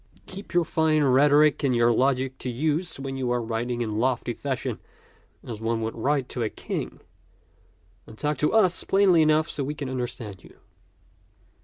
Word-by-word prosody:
Keep 190 -1 -10
your 175 -1 +4
fine 155 -1 +2
rhetoric 145 +3 +4
and 130 -3 +2
your 120 0 +4
logic 130 +1 0
to 130 - -4
use 155 +6 -1
when 135 -1 -5
you 130 -2 -2
are 120 0 +1
writing 120 +1 -3
in 110 -2 -2
lofty 125 -1 0
fashion 130 -3 -4 0.6
as 110 -2 -7
one 115 0 -1
would 110 0 -3
write 135 +3 0
to 125 - -4
a 110 - 0
king; - - -5 1.1
and 110 - -13
talk 150 +3 -2
to 150 - +2
us 190 -6 +3
plainly 190 -4 +4
enough 155 0 +3
so 145 - -3
we 145 +3 -4
can 140 -3 -5
understand 120 -6 -5
you." - - -16
135 Hz, 175 wpm, -25 LUFS, 120-150 Hz, 1.1 s, your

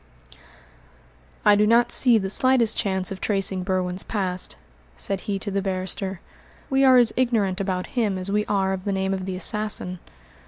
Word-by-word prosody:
"I 210 -1 +6
do 210 +1 +3
not 235 +2 +3
see 245 -3 +4
the 190 -2 -2
slightest 255 -2 +3
chance 190 -2 -1
of 190 - -7
tracing 195 -2 -1
Berwin's 185 0 -1
past," 185 -4 -3 0.4
said 195 -1 -2
he 200 - 0
to 200 +1 -6
the 195 0 -1
barrister. 190 -1 -1 0.5
"We 270 0 +3
are 260 -1 +6
as 240 -2 +4
ignorant 215 -7 0
about 185 -2 -2
him 215 -6 0
as 185 +1 -4
we 210 +1 +1
are 195 -2 0
of 190 0 -6
the 200 - -1
name 190 0 -1
of 190 -1 -4
the 185 - -3
assassin." 190 -2 -1
195 Hz, 180 wpm, -23 LUFS, 185-215 Hz, 0.5 s, I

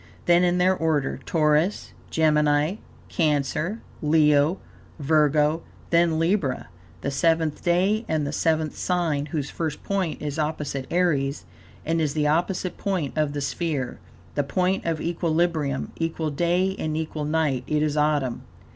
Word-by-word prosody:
Then, 175 +1 +5
in 180 0 +2
their 185 +1 +3
order, 155 -5 0
Taurus, 155 +4 +1 0.2
Gemini, 150 +2 +2 0.3
Cancer, 155 +6 0 0.2
Leo, 150 +1 +4 0.4
Virgo; 150 +1 +2 0.3
then 170 -1 +3
Libra, 165 - 0 0.3
the 140 - -2
seventh 160 +1 +1
day 190 +6 +2
and 155 -2 0
the 145 - -2
seventh 160 0 0
sign, 165 -5 0
whose 150 -2 -3
first 160 -3 -4
point 190 -5 -1
is 150 +1 -4
opposite 150 -3 -2
Aries 150 -6 0 0.4
and 165 +1 +1
is 150 -1 -1
the 150 -1 +1
opposite 175 +4 0
point 185 -8 -2
of 150 -2 0
the 145 - -3
sphere, 140 -3 -2 0.3
the 145 - 0
point 185 +7 0
of 165 -2 0
equilibrium, 165 -4 0
equal 165 -1 -2
day 175 +5 +1
and 155 0 -2
equal 155 -1 -3
night, 150 -4 0
it 150 0 +1
is 150 -1 0
autumn. 150 -5 +1
155 Hz, 140 wpm, -24 LUFS, 150-170 Hz, 0.4 s, Then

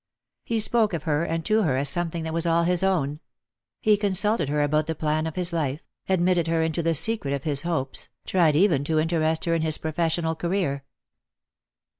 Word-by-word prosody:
He 230 -1 -1
spoke 220 -2 +2
of 160 -3 -3
her 155 0 0
and 165 -1 -3
to 215 +1 +2
her 150 -10 +1
as 140 +2 -1
something 165 +2 -1
that 160 0 -4
was 165 +1 -1
all 170 0 +2
his 175 0 +1
own. 155 -7 0 0.6
He 210 -1 +4
consulted 200 -4 +1
her 150 0 +1
about 150 +1 0
the 160 - -2
plan 155 +1 -1
of 160 - -6
his 180 -1 0
life, 150 -2 -2 0.3
admitted 180 -2 +2
her 165 0 +1
into 160 +1 -1
the 165 0 0
secret 160 -3 +1
of 135 - -6
his 145 -3 0
hopes, 135 -8 -3 0.2
tried 165 -5 +2
even 160 -5 +3
to 160 +1 0
interest 160 0 +1
her 170 - +1
in 165 - +1
his 155 -1 +1
professional 160 +1 -1
career. 165 -5 -2
165 Hz, 200 wpm, -24 LUFS, 155-175 Hz, 0.6 s, He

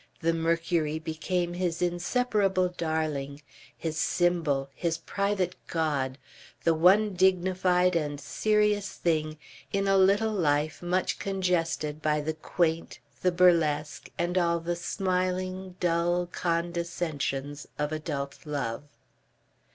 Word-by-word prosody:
The 165 0 +2
Mercury 165 -1 0
became 170 +2 -2
his 175 -2 -1
inseparable 185 +1 +1
darling, 155 -4 -3 0.3
his 160 -1 -3
symbol, 165 -6 +1
his 165 +1 -1
private 195 +1 -1
god, 145 -5 -1 0.5
the 165 - +4
one 190 +6 +4
dignified 180 -1 +3
and 145 -3 -1
serious 210 +5 +1
thing 155 -2 -1 0.3
in 195 0 0
a 195 0 +4
little 205 +3 +4
life 155 -4 +1
much 180 +1 0
congested 170 -5 -1
by 150 0 +1
the 155 +2 -2
quaint, 165 +1 -1 0.2
the 180 - +3
burlesque, 165 -4 +2
and 175 +2 +1
all 170 -1 +2
the 170 +1 -2
smiling, 185 0 -2
dull 175 0 +1
condescensions 170 -5 -2
of 150 0 -1
adult 145 -3 -4
love. 140 -3 -3
170 Hz, 110 wpm, -28 LUFS, 155-185 Hz, 0.5 s, the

